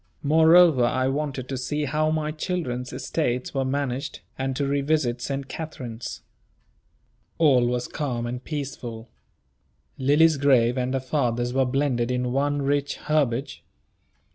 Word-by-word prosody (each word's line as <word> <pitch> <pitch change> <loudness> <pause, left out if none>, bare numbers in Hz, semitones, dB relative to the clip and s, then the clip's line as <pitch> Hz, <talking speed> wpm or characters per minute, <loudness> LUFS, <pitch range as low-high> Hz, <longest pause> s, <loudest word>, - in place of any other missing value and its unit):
Moreover, 160 -1 +6
I 130 +2 +1
wanted 135 -2 -3
to 135 -2 -3
see 150 +3 -2
how 155 +3 +1
my 155 -1 -1
children's 155 -7 -3
estates 125 -6 -2
were 135 -1 0
managed, 135 +1 -3
and 135 0 -2
to 140 - -1
revisit 140 -3 0
St. 135 +2 -3
Katharine's. 125 -7 -7 1.1
All 135 -7 +4
was 125 0 -1
calm 125 -6 -3
and 125 +1 -5
peaceful. 120 -6 -6 0.9
Lily's 150 +4 +4
grave 125 -4 +3
and 130 0 -1
her - - +1
father's 125 -3 -1
were 135 0 +2
blended 125 -2 0
in 125 0 -1
one 145 +2 0
rich 145 +1 0
herbage. 140 -4 -1
135 Hz, 135 wpm, -25 LUFS, 125-150 Hz, 1.1 s, Moreover